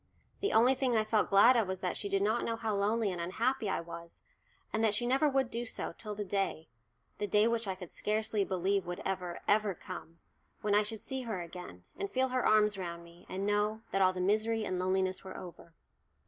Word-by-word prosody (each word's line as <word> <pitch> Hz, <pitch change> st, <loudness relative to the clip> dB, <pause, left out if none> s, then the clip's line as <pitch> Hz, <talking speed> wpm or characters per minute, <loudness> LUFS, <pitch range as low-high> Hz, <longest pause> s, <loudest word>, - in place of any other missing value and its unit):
The 405 Hz, -, 0 dB
only 240 Hz, +4 st, +6 dB
thing 260 Hz, -2 st, 0 dB
I 215 Hz, -, +3 dB
felt 215 Hz, 0 st, +1 dB
glad 205 Hz, +6 st, +7 dB
of 225 Hz, -5 st, +2 dB
was 190 Hz, 0 st, -4 dB
that 180 Hz, -, -1 dB
she 200 Hz, -, -3 dB
did 195 Hz, 0 st, +1 dB
not 220 Hz, +3 st, +1 dB
know 230 Hz, -, -1 dB
how 225 Hz, -1 st, -2 dB
lonely 205 Hz, +1 st, +1 dB
and 175 Hz, -2 st, -4 dB
unhappy 225 Hz, +6 st, 0 dB
I -, -, 0 dB
was, 170 Hz, 0 st, -10 dB, 0.5 s
and 220 Hz, -, +1 dB
that 215 Hz, -2 st, +4 dB
she 240 Hz, -, 0 dB
never 270 Hz, +5 st, +3 dB
would 270 Hz, -2 st, +1 dB
do 235 Hz, +1 st, -2 dB
so 230 Hz, -, -4 dB
till 210 Hz, -2 st, -6 dB
the 205 Hz, 0 st, -4 dB
day 195 Hz, -5 st, -2 dB, 0.5 s
the 205 Hz, -, -1 dB
day 210 Hz, +3 st, +4 dB
which 230 Hz, -2 st, 0 dB
I 190 Hz, -, -1 dB
could 180 Hz, -2 st, -10 dB
scarcely 215 Hz, -1 st, 0 dB
believe 190 Hz, 0 st, 0 dB
would 175 Hz, 0 st, -4 dB
ever, 180 Hz, -2 st, -3 dB
ever 210 Hz, -2 st, +3 dB
come 165 Hz, 0 st, -9 dB, 0.4 s
when 210 Hz, -1 st, 0 dB
I 205 Hz, -, +6 dB
should 215 Hz, +1 st, -3 dB
see 265 Hz, -1 st, -3 dB
her 215 Hz, -8 st, -3 dB
again, 170 Hz, -, -10 dB
and 400 Hz, -, -3 dB
feel 260 Hz, -3 st, +1 dB
her 255 Hz, 0 st, 0 dB
arms 210 Hz, -2 st, +4 dB
round 170 Hz, -2 st, -5 dB
me, 170 Hz, +1 st, -16 dB
and 190 Hz, +1 st, -3 dB
know 210 Hz, +1 st, +1 dB
that 195 Hz, -, +1 dB
all 185 Hz, -1 st, +5 dB
the 185 Hz, -1 st, -4 dB
misery 215 Hz, +3 st, +1 dB
and 185 Hz, -1 st, -2 dB
loneliness 185 Hz, 0 st, 0 dB
were 190 Hz, -, -8 dB
over! 170 Hz, -2 st, -11 dB
205 Hz, 230 wpm, -32 LUFS, 185-225 Hz, 0.5 s, glad